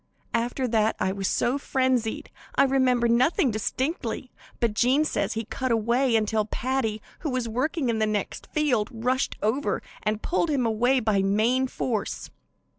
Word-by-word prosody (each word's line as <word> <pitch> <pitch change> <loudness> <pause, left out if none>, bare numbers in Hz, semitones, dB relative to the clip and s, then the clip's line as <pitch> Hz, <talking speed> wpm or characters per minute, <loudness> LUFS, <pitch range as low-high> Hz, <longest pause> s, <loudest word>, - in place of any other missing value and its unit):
After 245 +3 0
that 220 -1 +2
I 190 - +1
was 195 -1 -2
so 255 +4 +1
frenzied 260 -5 0 0.2
I - - +5
remember 260 -3 +3
nothing 250 +3 +3
distinctly, 250 - -2 0.3
but 230 -3 +1
Jean 255 +7 +3
says - - -1
he 225 0 -3
cut 260 +3 -3
away 235 +3 +2
until 215 0 +2
Paddy, 225 -2 -2 0.2
who 310 - -3
was 255 -3 -1
working 260 +5 -1
in 230 -2 0
the 215 - +2
next 210 -2 -3
field, 255 -9 +1
rushed 250 +3 -1
over 245 +7 0 0.2
and 215 0 -2
pulled 340 -1 0
him 275 -5 +1
away 245 +4 +2
by 215 -3 +2
main 220 +7 +2
force. 235 -4 -3
240 Hz, 160 wpm, -26 LUFS, 220-260 Hz, 0.3 s, I